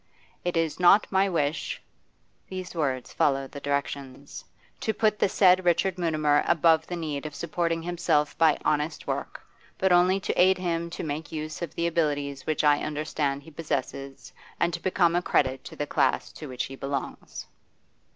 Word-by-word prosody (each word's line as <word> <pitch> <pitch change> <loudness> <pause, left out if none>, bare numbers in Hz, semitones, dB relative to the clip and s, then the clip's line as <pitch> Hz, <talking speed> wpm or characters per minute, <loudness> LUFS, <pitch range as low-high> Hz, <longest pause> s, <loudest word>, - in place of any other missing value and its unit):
'It 175 -1 -1
is 165 -1 0
not 180 +4 +6
my 195 +1 +3
wish' 155 -3 -1 0.7
these 185 -1 -6
words 135 -6 -2
followed 135 -1 +1
the 140 - -7
directions 140 -1 -4 0.4
'to 220 - -1
put 215 -1 +1
the - - +3
said 185 -1 +5
Richard 180 +2 +1
Mutimer 155 -3 +2
above 160 -1 +4
the 175 - -4
need 155 -3 -4
of 150 - -10
supporting 165 0 -2
himself 165 -4 0
by 160 -2 +5
honest 150 +1 0
work, - - -4 0.3
but 190 -1 +2
only 180 +2 +4
to - - -2
aid 185 +1 +5
him 170 -2 -2
to 170 - -6
make 155 +1 -4
use 155 0 -5
of 170 -4 -5
the 170 - -1
abilities 145 -4 -1
which 155 -1 0
I 145 -1 +5
understand 145 -2 -2
he 160 - -13
possesses, 140 -3 -5 0.3
and 170 0 +1
to 170 - -3
become 175 -2 +2
a 175 - +2
credit 135 -6 +1
to - - -9
the 145 - -2
class - - +1
to 155 - -9
which 125 -1 -3
he 135 - -8
belongs. 135 0 -5
160 Hz, 175 wpm, -26 LUFS, 145-175 Hz, 0.7 s, not